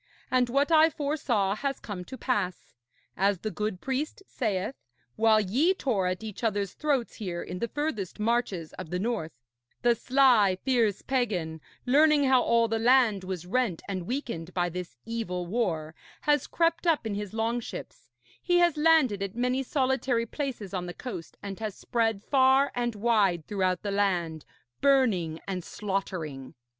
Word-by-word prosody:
And 250 -1 +3
what 280 +5 +2
I 320 0 +7
foresaw 280 -10 0
has 275 +1 -2
come 195 -4 -6
to 260 - -8
pass. 185 -7 -2 0.4
As 195 +1 +2
the 215 - -3
good 210 -3 -3
priest 275 +8 -3
saith, 210 - -2 0.4
while 220 -1 +4
ye 260 - +2
tore 215 - 0
at 185 +3 -3
each 215 +1 -7
other's 205 -3 0
throats 280 -6 -1
here 180 -6 -4
in 180 - -6
the 235 - -1
furthest 230 - -3
marches 210 -7 -1
of - - -7
the 180 - -2
north, 205 -6 -2 0.5
the 240 0 +5
sly, 235 -6 +4
fierce 235 -6 +2
pagan, 185 - -1 0.2
learning 295 +3 +5
how 260 -2 +5
all 230 -1 +3
the 225 0 -1
land 235 -4 +4
was 185 -2 -5
rent 210 -3 0
and 185 -3 -4
weakened 230 - -4
by 175 -1 +1
this 175 -5 -6
evil 210 -6 -3
war, 170 -7 -1 0.3
has 295 0 +2
crept 335 +1 +1
up 320 -7 +2
in 220 - -2
his 205 -1 -4
longships, 230 +1 -4 0.3
he 355 -1 +2
has 345 -3 +3
landed 300 -10 +4
at 200 0 -4
many 250 +2 0
solitary 260 -3 0
places 235 -6 -5
on 180 -2 -3
the 175 - -7
coast, 170 - -7
and 195 -1 -6
has 215 -3 -4
spread 225 -4 -1
far 270 0 +4
and 240 -2 -1
wide 205 -7 +2
throughout 185 -3 -1
the 205 - -2
land, 175 -6 0 0.4
burning 215 - +3
and 185 -2 -3
slaughtering. 175 -10 -4
225 Hz, 165 wpm, -28 LUFS, 185-260 Hz, 0.5 s, I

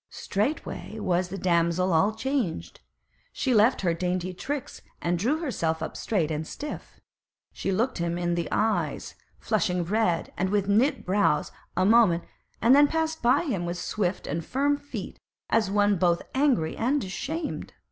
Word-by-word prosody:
Straightway 215 0 -3
was 185 -3 0
the 195 - -5
damsel 170 0 +2
all 200 +7 +3
changed; 255 - -2 0.5
she 260 - 0
left 225 +3 +4
her 175 -3 +1
dainty 180 +1 -2
tricks, 280 +9 -5 0.2
and 175 0 -1
drew 255 - +1
herself 170 - -2
up - - -5
straight 170 -8 -1
and 155 0 -3
stiff. 295 0 -7 0.5
She 195 - -2
looked 220 0 0
at - - 0
him 170 0 -2
in 175 0 0
the 170 -1 -1
eyes, 220 0 0 0.2
flushing 180 -5 0
red, 180 -2 0
and 190 +1 0
with 200 -1 +1
knit 245 +7 +2
brows, 185 -5 +2 0.3
a 185 - +3
moment, 205 -6 +5 0.4
and 245 +4 +7
then 290 +1 +7
passed 320 +1 -1
by 240 +6 +4
him 220 - -2
with 175 +1 -3
swift 185 0 -2
and 160 +3 -3
firm 280 - +1
feet 285 0 -7 0.3
as 220 -3 +3
one 205 0 +3
both 170 -1 +2
angry 260 - +2
and 265 +5 +1
ashamed. 295 - -4
200 Hz, 165 wpm, -26 LUFS, 175-255 Hz, 0.5 s, and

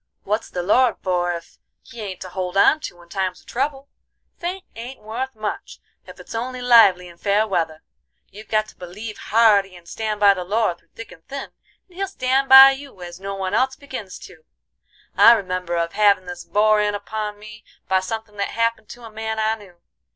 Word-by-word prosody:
What's 210 +3 -2
the 180 - -4
Lord 235 +5 +3
for 175 -2 0
ef 170 -1 -8 0.2
He 230 - -11
ain't 190 -3 -7
to 185 - -7
hold 180 +1 -4
on 305 +9 +5
to 175 - -9
in 170 - -22
times 185 -1 -2
of - - -28
trouble. 275 +2 -3 0.5
Faith 365 +2 -5
ain't 240 +4 -8
wuth 240 +4 -5
much 215 -1 -6 0.3
ef - - -12
it's - - -11
only 250 +3 -4
lively 225 -8 +5
in 170 -1 -15
fair 205 +3 +1
weather; 165 -5 -2 0.5
you've 215 +2 -12
got 215 0 0
to - - -17
believe 205 +5 -8
hearty 205 -4 +3
and 175 -1 -16
stan' 215 +1 -3
by 205 -1 +6
the 185 -2 -5
Lord 200 -2 0
through - - -34
thick 230 - -10
and 165 -2 -15
thin, 275 0 -7 0.4
and 360 - -22
He'll 390 0 -1
stan' 270 -6 0
by 265 +1 +10
you 270 -9 -9
as 175 0 -9
no 195 +1 -5
one 190 0 -3
else 260 +4 +1
begins 260 -9 -8
to. - - -16 0.7
I 235 - +8
remember 185 -5 -2
of 170 0 -1
havin' 200 -2 +3
this 175 0 -8
bore 215 0 +3
in 205 0 0
upon 210 0 -5
me 215 +1 -13 0.2
by 190 0 +3
somethin' 210 +2 -6
that 200 - -1
happened 230 -2 -1
to 240 - -11
a 225 - -10
man 220 0 -4
I 220 0 +1
knew. 190 -6 -13
210 Hz, 205 wpm, -21 LUFS, 185-230 Hz, 0.7 s, by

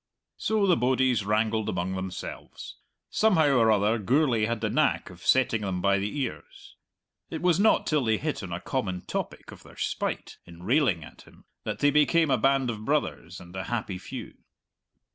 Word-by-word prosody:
So 215 -2 +1
the 180 -3 +4
bodies 125 -3 +2
wrangled 110 +1 0
among 90 +1 -2
themselves. 95 -1 -7 0.3
Somehow 175 -9 +3
or 115 -1 +4
other 105 +2 +2
Gourlay 120 0 +2
had 115 0 -2
the 110 0 -1
knack 145 -5 +1
of 90 -1 -15
setting 125 -4 +3
them 95 -3 -2
by 100 +1 +2
the 105 +9 -3
ears. 75 - -7 0.5
It 160 - -5
was 180 -1 +3
not 220 +2 +4
till 150 -3 +1
they 110 -1 +2
hit 155 +4 -3
on 95 -3 -7
a 85 - -3
common 95 -5 -3
topic - - -5
of - - -13
their - - -16
spite - - -3
in 85 0 -14
railing 115 - +2
at - - -13
him - - -19 0.2
that - - -4
they 145 - +4
became 150 +1 +3
a - - +4
band 135 -1 +2
of 110 -1 -7
brothers 125 - -2
and 85 +1 -13
a 95 - -4
happy 110 -6 -3
few. - - -8
115 Hz, 185 wpm, -27 LUFS, 95-145 Hz, 0.5 s, the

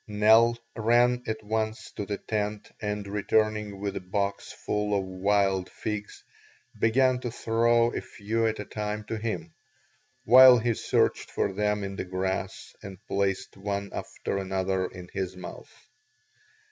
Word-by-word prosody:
Nell 110 +3 +5 0.2
ran 120 +2 +3
at 110 0 -3
once 110 +1 -2
to 100 - -6
the 100 - -2
tent 105 -1 -3
and 105 -1 -3
returning 105 0 0
with 100 0 -3
a - - -2
box 100 +2 -2
full 105 -1 -1
of 95 - -1
wild 95 0 +1
figs, 105 -1 -5 0.6
began 130 +3 +3
to 125 - -4
throw 115 +1 +2
a - - -2
few 115 +2 -2
at 110 - -1
a 105 - -5
time 105 0 -4
to 110 +1 -4
him, 115 +9 -4 0.7
while 130 +2 +9
he 120 0 +1
searched - - 0
for 100 - -1
them 105 +1 0
in 100 0 -5
the - - -3
grass 95 +1 -3
and 95 -1 -9
placed 100 -2 -1
one 100 0 -4
after 100 - -4
another 95 -1 -1
in 90 -1 -10
his 95 -1 -3
mouth. 90 - -9
105 Hz, 150 wpm, -27 LUFS, 100-110 Hz, 0.7 s, while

